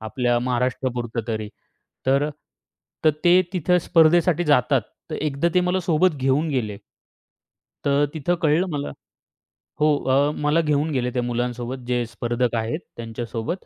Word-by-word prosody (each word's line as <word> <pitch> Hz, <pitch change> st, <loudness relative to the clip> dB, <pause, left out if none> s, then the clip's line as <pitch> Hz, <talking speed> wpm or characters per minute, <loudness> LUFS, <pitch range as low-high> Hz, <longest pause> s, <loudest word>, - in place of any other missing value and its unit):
आपल्या 120 Hz, +2 st, 0 dB
महाराष्ट्रापुरतं 125 Hz, -1 st, -1 dB
तरी. 110 Hz, -2 st, -3 dB, 0.6 s
तर 140 Hz, +2 st, +3 dB, 0.8 s
तर 155 Hz, -, +7 dB
ते 175 Hz, +1 st, +6 dB
तिथं 180 Hz, 0 st, +2 dB
स्पर्धेसाठी 170 Hz, +1 st, +3 dB
जातात. 135 Hz, -4 st, +3 dB, 0.3 s
तर -, -, -3 dB
एकदा 150 Hz, +2 st, 0 dB
ते 180 Hz, -, +5 dB
मला 180 Hz, +1 st, 0 dB
सोबत 165 Hz, 0 st, +2 dB
घेऊन 135 Hz, +4 st, +1 dB
गेले. 115 Hz, -8 st, -2 dB, 1.1 s
तर 140 Hz, +1 st, +3 dB
तिथं 160 Hz, +3 st, 0 dB
कळलं 160 Hz, +4 st, +3 dB
मला 145 Hz, -1 st, -3 dB, 0.9 s
हो 150 Hz, -, +4 dB, 0.2 s
अ, 140 Hz, +3 st, +3 dB
मला 150 Hz, +3 st, +3 dB
घेऊन 150 Hz, 0 st, +1 dB
गेले 125 Hz, -3 st, 0 dB
त्या 125 Hz, -, -1 dB
मुलांसोबत, 120 Hz, +1 st, -3 dB
जे 120 Hz, -1 st, 0 dB
स्पर्धक 120 Hz, +1 st, -2 dB
आहेत 115 Hz, +7 st, -2 dB, 0.2 s
त्यांच्यासोबत 115 Hz, -, -5 dB
135 Hz, 135 wpm, -23 LUFS, 120-155 Hz, 1.1 s, तर